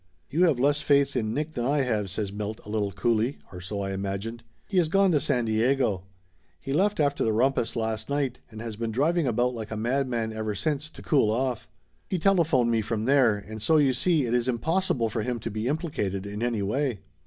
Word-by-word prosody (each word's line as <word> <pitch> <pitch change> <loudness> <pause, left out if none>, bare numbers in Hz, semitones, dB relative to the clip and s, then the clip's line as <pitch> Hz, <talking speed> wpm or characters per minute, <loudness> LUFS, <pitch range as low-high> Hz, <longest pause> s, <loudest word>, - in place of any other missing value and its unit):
"You 170 +5 +4
have 150 -8 +2
less 145 +3 +3
faith 140 -2 +3
in 110 -4 0
Nick 150 +6 -2
than 120 - -2
I 140 +2 +2
have," 105 -6 -1
says 100 +1 -3
Milt 105 +1 -4
a - - -10
little 105 -2 -1
coolly, 115 +6 0
or 90 - -8
so 100 +3 -4
I 95 - -3
imagined. 100 +4 -4 0.3
"He 195 - -2
has 175 -3 +4
gone 195 +3 +3
to 150 - +3
San 135 -4 0
Diego. 110 -3 +1 0.5
He 135 - -4
left 200 +6 +2
after 145 -1 +2
the 110 - +2
rumpus 120 +1 +1
last 110 0 -2
night, 140 -3 -1
and 110 0 -9
has 115 -2 -5
been 115 +1 -3
driving 150 +7 +1
about 120 +1 +1
like 110 -3 -6
a 110 - -4
madman 120 -1 -1
ever 110 -1 -3
since, 150 +7 -2
to - - -13
cool 135 -8 +3
off. 125 +1 -1 0.4
He 185 - 0
telephoned 160 -10 +3
me 115 -1 +2
from 110 0 -2
there, 130 -5 +4
and 110 +1 -8
so 160 +8 +4
you 140 -3 +4
see 155 +2 +2
it 120 - -1
is 120 0 +1
impossible 130 -1 0
for 110 +1 -2
him 120 +2 -2
to 115 +1 -5
be 110 +2 -3
implicated 130 - -2
in 105 +2 -5
any 120 -4 0
way." 120 - -1
120 Hz, 220 wpm, -26 LUFS, 110-140 Hz, 0.5 s, You